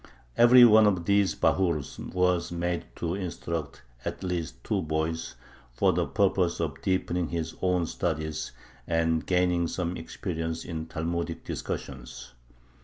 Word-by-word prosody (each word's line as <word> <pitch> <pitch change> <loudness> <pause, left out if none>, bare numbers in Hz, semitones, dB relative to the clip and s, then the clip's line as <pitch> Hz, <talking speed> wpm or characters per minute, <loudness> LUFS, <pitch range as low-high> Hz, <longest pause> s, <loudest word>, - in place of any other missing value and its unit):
Every 120 +1 +8
one 110 -2 +7
of 95 -4 +1
these 100 0 +3
bahurs 85 -7 +1
was 90 -1 0
made 85 0 -2
to 85 0 -2
instruct 85 -6 -4 0.2
at - - -5
least 85 -9 -3
two - - 0
boys, 80 +1 -2 0.4
for - - +3
the - - 0
purpose 95 -3 +1
of 75 -5 -3
deepening 90 -2 0
his 80 -1 -3
own 90 -2 +2
studies 80 -2 -3 0.4
and 80 -1 +1
gaining 90 -2 +2
some 90 +1 -2
experience 80 -1 -4
in 80 -2 -5
Talmudic 85 +1 -3
discussions. 65 -2 -6
85 Hz, 130 wpm, -28 LUFS, 80-90 Hz, 0.4 s, Every